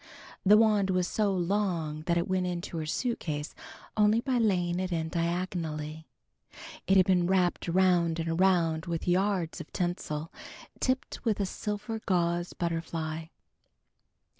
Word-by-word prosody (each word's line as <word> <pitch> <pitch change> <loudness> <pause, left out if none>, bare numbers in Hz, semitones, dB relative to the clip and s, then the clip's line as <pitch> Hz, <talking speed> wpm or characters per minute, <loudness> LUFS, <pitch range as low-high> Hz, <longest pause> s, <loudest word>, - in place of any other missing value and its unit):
The 205 +2 +7
wand 210 -3 +3
was 180 -1 +1
so 210 0 +1
long 175 -5 -1
that 170 - +2
it 170 - 0
went 185 -1 0
into 175 -1 -4
her 155 -1 -3
suitcase 155 - -2 0.4
only 215 +1 +4
by 255 0 0
laying 180 -5 +1
it 185 0 -2
in 160 -1 -1
diagonally. 165 -3 -3 0.8
It 195 - +5
had 185 - +6
been 180 -2 +3
wrapped 180 -2 +1
around 175 -2 +3
and 165 - -2
around 165 -1 +2
with 170 0 -3
yards 180 -2 +1
of 160 - -12
tinsel, 170 -4 -3 0.5
tipped 260 0 -1
with 220 -4 0
a 200 - +1
silver 210 +3 -4
gauze 175 -1 +1
butterfly. 165 -1 -3
175 Hz, 140 wpm, -29 LUFS, 165-195 Hz, 0.8 s, The